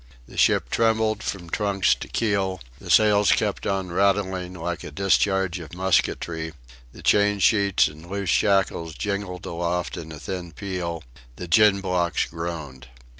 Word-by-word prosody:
The -, -, -14 dB
ship -, -, +3 dB
trembled 110 Hz, -1 st, +1 dB
from 90 Hz, -5 st, -5 dB
trucks 100 Hz, +2 st, +1 dB
to -, -, -7 dB
keel; 100 Hz, -4 st, -1 dB, 0.2 s
the -, -, -11 dB
sails 105 Hz, -2 st, +5 dB
kept -, -, 0 dB
on 95 Hz, -2 st, -2 dB
rattling 95 Hz, -1 st, 0 dB
like 85 Hz, 0 st, -4 dB
a -, -, -6 dB
discharge 95 Hz, -1 st, +1 dB
of 80 Hz, 0 st, -10 dB
musketry; 85 Hz, -3 st, 0 dB, 0.4 s
the -, -, -14 dB
chain 105 Hz, 0 st, +3 dB
sheets 100 Hz, -1 st, +3 dB
and 80 Hz, +3 st, -11 dB
loose 100 Hz, -1 st, -2 dB
shackles 95 Hz, -5 st, +1 dB
jingled 100 Hz, -3 st, -4 dB
aloft 85 Hz, +1 st, -2 dB
in 80 Hz, -1 st, -7 dB
a 75 Hz, -, -9 dB
thin 90 Hz, -1 st, -6 dB
peal; 85 Hz, -3 st, -4 dB, 0.3 s
the 90 Hz, -, -7 dB
gin 100 Hz, +3 st, +5 dB
blocks 90 Hz, -3 st, 0 dB
groaned. 80 Hz, -6 st, -6 dB
95 Hz, 150 wpm, -24 LUFS, 85-100 Hz, 0.4 s, sails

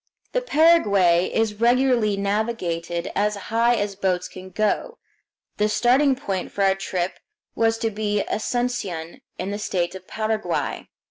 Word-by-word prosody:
The -, -, 0 dB
Paraguay 205 Hz, -, +4 dB
is 220 Hz, -1 st, -1 dB
regularly 240 Hz, -4 st, +3 dB
navigated 190 Hz, -5 st, -2 dB
as 210 Hz, +1 st, +1 dB, 0.2 s
high 235 Hz, +1 st, +4 dB
as 205 Hz, -3 st, -2 dB
boats 185 Hz, -2 st, 0 dB
can 185 Hz, 0 st, -11 dB
go. 215 Hz, -, -1 dB, 0.6 s
The 210 Hz, +1 st, +2 dB
starting 260 Hz, +5 st, +3 dB
point 195 Hz, -9 st, -4 dB
for 200 Hz, -, -1 dB
our 195 Hz, 0 st, +4 dB
trip 185 Hz, -2 st, -3 dB, 0.3 s
was 225 Hz, 0 st, +2 dB
to 225 Hz, 0 st, -1 dB
be 210 Hz, -1 st, -1 dB
Asuncion, 210 Hz, -8 st, -2 dB, 0.2 s
in 190 Hz, +2 st, -3 dB
the 205 Hz, -, -4 dB
state 175 Hz, -4 st, -1 dB
of 185 Hz, -1 st, -10 dB
Paraguay. 215 Hz, 0 st, -2 dB
210 Hz, 140 wpm, -23 LUFS, 190-235 Hz, 0.6 s, Paraguay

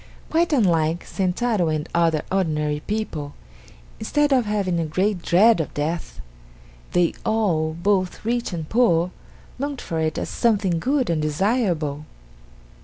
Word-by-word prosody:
Quite 330 Hz, +1 st, +2 dB
unlike 170 Hz, -, +2 dB
Sentaro 190 Hz, -1 st, 0 dB
and 155 Hz, +1 st, -2 dB
other 165 Hz, -2 st, +2 dB
ordinary 150 Hz, -6 st, 0 dB
people, 160 Hz, -9 st, -3 dB, 0.6 s
instead 295 Hz, -1 st, +1 dB
of 250 Hz, -4 st, +2 dB
having 195 Hz, -5 st, 0 dB
a 165 Hz, -, 0 dB
great 185 Hz, +4 st, 0 dB
dread 190 Hz, +3 st, +4 dB
of 155 Hz, -, -6 dB
death, 160 Hz, +3 st, -3 dB, 0.7 s
they 175 Hz, -1 st, +3 dB
all, 170 Hz, -8 st, +1 dB
both 185 Hz, +2 st, 0 dB
rich 240 Hz, 0 st, -1 dB
and 165 Hz, -3 st, -4 dB
poor, 180 Hz, -7 st, +2 dB, 0.5 s
longed 280 Hz, -1 st, -3 dB
for 165 Hz, -, -4 dB
it 160 Hz, -1 st, -1 dB
as -, -, -2 dB
something 200 Hz, -7 st, +1 dB
good 260 Hz, -, +1 dB
and 160 Hz, -2 st, 0 dB
desirable. 155 Hz, -, 0 dB
180 Hz, 135 wpm, -23 LUFS, 160-220 Hz, 0.7 s, dread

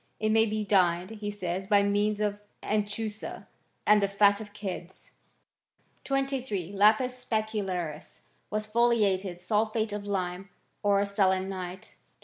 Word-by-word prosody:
It 215 Hz, -, +1 dB
may 225 Hz, +1 st, +4 dB
be 215 Hz, 0 st, -2 dB
dyed, 180 Hz, -1 st, +2 dB
he 210 Hz, -2 st, -5 dB
says, 190 Hz, -2 st, -3 dB
by 205 Hz, -1 st, +5 dB
means 205 Hz, +1 st, +1 dB
of 205 Hz, -1 st, -1 dB, 0.2 s
anchusa 210 Hz, 0 st, -3 dB, 0.4 s
and 210 Hz, 0 st, +6 dB
the 200 Hz, -, +3 dB
fat 200 Hz, +1 st, +4 dB
of 205 Hz, -1 st, -9 dB
kids, 190 Hz, -3 st, -7 dB, 0.9 s
23. 265 Hz, -9 st, -2 dB
Lapis 235 Hz, +5 st, +3 dB
specularis 195 Hz, -9 st, -3 dB, 0.3 s
was 215 Hz, +1 st, -1 dB
foliated 210 Hz, -5 st, +2 dB
sulphate 215 Hz, +3 st, 0 dB
of 205 Hz, 0 st, -5 dB
lime, 185 Hz, -1 st, -3 dB, 0.3 s
or 200 Hz, 0 st, +3 dB
selenite. 190 Hz, -2 st, -1 dB
205 Hz, 125 wpm, -28 LUFS, 190-215 Hz, 0.9 s, and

